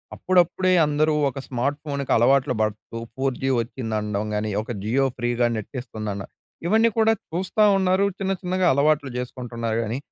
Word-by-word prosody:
అప్పుడప్పుడే 185 0 +2 0.2
అందరూ 150 +1 +2 0.2
ఒక 135 +1 -7
స్మార్ట్ 135 +4 -1
ఫోన్‌కి 140 -2 -3
అలవాట్లు 130 +3 +3
పడుతూ, 110 +1 -3 0.2
4జీ 135 0 -1
వచ్చిందనడం 110 -4 -3
గాని, 105 +1 -1
ఒక 115 - -7
జియో 130 +6 +2
ఫ్రీగా 120 0 +1
నెట్ 110 -2 -6
ఇస్తుందన్న, 110 -5 -5 0.4
ఇవన్నీ 225 +4 +4
కూడా 225 0 +4 0.2
చూస్తా 190 +5 +1
ఉన్నారు. 190 +1 +2
చిన్న 195 0 0
చిన్నగా 185 0 +1
అలవాట్లు 145 -1 +2
చేసుకుంటున్నారు 120 -2 -4
గాని, 115 +3 -3
135 Hz, 140 wpm, -23 LUFS, 115-175 Hz, 0.4 s, ఇవన్నీ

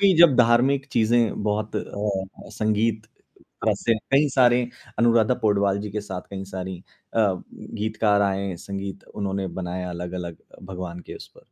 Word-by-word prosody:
कि 200 -1 +6
जब 170 -6 +8
धार्मिक 125 +4 +4
चीज़ें 115 -1 +2
बहुत 105 +1 -1
अ - - +2
अ, 100 -2 -4
संगीत 110 0 +1 0.6
क - - +4
से 115 - +1 0.2
कई 145 +2 +4
सारे 125 -2 +5 0.4
अनुराधा 115 0 +4
पौडवाल 100 -2 +2
जी 105 -1 -5
के 105 - -3
साथ 95 -3 -5
कई 95 -1 -5
सारी 95 -1 -5 0.4
अ, - - +1 0.6
गीतकार 105 -1 +2
आए, 95 -1 0
संगीत 100 +1 -6
उन्होंने 100 -1 -2
बनाया 90 0 -4
अलग-अलग 85 -1 -5 0.2
अ, - - -15
भगवान 90 -2 -6
के - - -7
उस - - -10
पर। - - -24
105 Hz, 160 wpm, -24 LUFS, 95-115 Hz, 0.6 s, जब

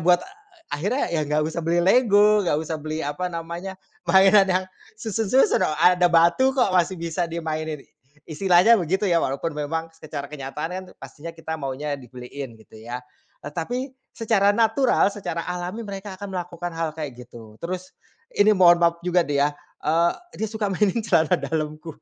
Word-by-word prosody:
buat 175 +2 +4 0.5
akhirnya 195 - -1
ya, 160 - +1
enggak 150 +1 0
usah 160 +2 -3
beli 170 +1 +1
lego, 210 -1 +5
enggak 150 - +2
usah 160 -1 -4
beli, 155 +1 -4
apa 145 +5 -3
namanya, 170 +3 -6 0.3
mainan 195 +1 +6
yang 185 0 +1 0.3
susun-susun, 225 +3 +2
oh, 155 - -2
ada 180 +2 +5
batu 170 +9 +4
kok, 205 -7 +3
masih 180 0 +2
bisa 170 +1 -2
dimainin, 155 -3 -4
i - - -33 0.4
istilahnya 180 +5 +4
begitu 190 +5 0
ya, 170 -4 +3
walaupun 140 +5 -2
memang 160 +2 -4
secara 155 -3 -7
kenyataan 145 +2 -5
kan 185 +1 -5
pastinya 145 +4 -10
kita 160 -1 -5
maunya 140 +2 -3
dibeliin, 125 0 -9
gitu 110 0 -16
ya. 120 +2 -7 0.4
Eee, - - -6
tapi 175 +10 -3 0.4
secara 215 -3 +3
natural, 230 +1 +3
secara 175 -5 -4
alami, 180 +5 -4
mereka 195 -1 -7
akan 200 0 -7
melakukan 175 0 -5
hal 165 0 -2
kayak 150 -4 -5 0.2
gitu. 110 -2 -13
Terus, 185 +2 -5 0.4
ini 210 +1 +4
mohon 175 -2 +6
maaf 170 0 +3
juga 180 0 +3
nih 140 -1 +2
ya, - - +3 0.4
eee, 165 +3 +3 0.3
dia 220 - -1
suka 210 -2 -2
mainin 205 +3 +1
celana 165 -7 +3
dalamku, 155 +2 -4
170 Hz, 170 wpm, -23 LUFS, 155-190 Hz, 0.5 s, mainan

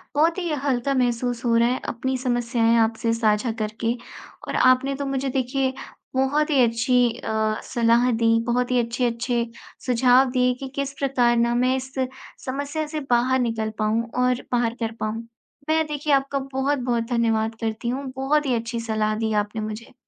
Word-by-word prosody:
बहुत 325 +4 +3
ही 350 -3 -2 0.2
हल्का 270 0 +1
महसूस 245 -1 0
हो 230 -1 +3
रहा 230 +1 +4
है 255 - -1
अपनी 260 +3 -2
समस्याएँ 240 -2 +1
आपसे 230 +1 0
साझा 225 +1 +1
करके। 220 +2 -1 0.5
और - - -3
आपने 255 +2 +3
तो 280 +1 -4
मुझे 270 0 -1
देखिए 265 +1 0 0.4
बहुत 285 +4 +2
ही 275 -4 +4
अच्छी 235 +2 +2 0.2
अ, 220 0 -1
सलाह 235 +1 +2
दी 230 0 +3
बहुत 245 +1 0
ही 250 - +3
अच्छे-अच्छे 235 0 0 0.4
सुझाव 255 +1 +4
दिए 250 -1 +2
कि 270 - -5
किस 280 0 -2
प्रकार 245 -4 +2
ना 235 0 +2
मैं 255 +2 +2
इस 260 0 -5 0.5
समस्या 285 +4 -3
से 305 0 -4
बाहर 250 +2 +3
निकल 225 -3 -1
पाऊँ 215 +2 +1 0.2
और 250 0 +1
बाहर 240 -2 +1
कर 225 -1 -2
पाऊँ। 225 +2 -3 0.4
मैं 315 0 +3
देखिए 295 0 -1
आपका 275 0 +1
बहुत-बहुत 260 -3 0
धन्यवाद 225 -2 +1
करती 225 +1 -2
हूँ। 270 +3 -3
बहुत 290 +3 +1
ही 260 - +1
अच्छी 230 +1 -3
सलाह 215 -2 -1
दी 220 0 -1
आपने 210 +1 -1
मुझे। 215 +3 -6
245 Hz, 170 wpm, -23 LUFS, 230-265 Hz, 0.5 s, रहा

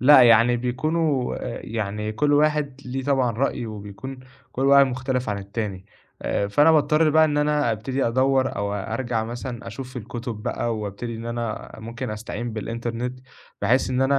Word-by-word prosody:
لا، 130 0 +8
يعني 120 +1 +6
بيكُونوا، 135 +2 0
آآ 120 -2 -5
يعني 105 -1 -3
كل 145 +6 +1
واحد 145 -2 +2
ليه 130 +1 -3
طبعًا 135 -4 +2
رأيه 120 0 -1
وبيكُون 110 +5 -8 0.3
كل 135 +2 0
واحد 140 0 +7
مختلِف 130 -1 -2
عن 100 -1 -1
التاني 100 -1 -5 0.4
آآ، 100 - 0
فأنا 145 +9 +5
باضطر 155 0 +4
بقى 160 +1 +6
إن 150 -1 0
أنا 150 -4 +2
أبتدي 130 +5 -1
أدوّر 130 +2 +2
أو 100 0 -1
أرجَع 115 +3 -2
مثلًا 120 0 -6
أشوف 125 +3 -7
في 125 - -5
الكُتُب 115 -1 -6
بقى 115 -2 -1
وأبتدي 105 +3 -5
إن 115 +1 -7
أنا 115 -2 -4
ممكن 115 +2 -5
استعين 115 +2 -5
بالإنترنت 115 +3 -4 0.4
بحيث 125 +5 +3
إن 130 +1 +1
أنا 135 +1 +3
120 Hz, 170 wpm, -24 LUFS, 110-135 Hz, 0.4 s, لا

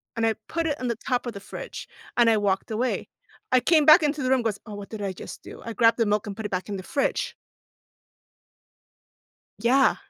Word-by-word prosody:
and 225 0 +1
I 220 - +2
put 330 0 -1
it 295 - -2
on 250 -1 -2
the 235 - -2
top 250 -1 0
of 240 - -4
the 200 - -7
fridge, - - -8 0.3
and 235 -1 +6
I 220 - +4
walked 195 -2 0
away. 245 +4 -1 0.4
I 255 -1 +5
came 315 -3 +4
back 310 +2 +8
into 295 -1 0
the 255 - 0
room, 260 -3 +3
goes, 215 -3 -1
"Oh, 210 - -7
what 205 -1 -8
did 220 -2 -7
I 195 -2 -2
just - - -9
do?" - - -11
I 230 - -4
grabbed 230 -1 +4
the 230 - +2
milk 210 +1 0
and 200 - -5
put 220 - -5
it - - -4
back 185 +2 -3
in 205 - -2
the 185 - -7
fridge. 280 +6 -1 2.2
Yeah. 255 +5 +4
230 Hz, 230 wpm, -25 LUFS, 205-260 Hz, 2.2 s, back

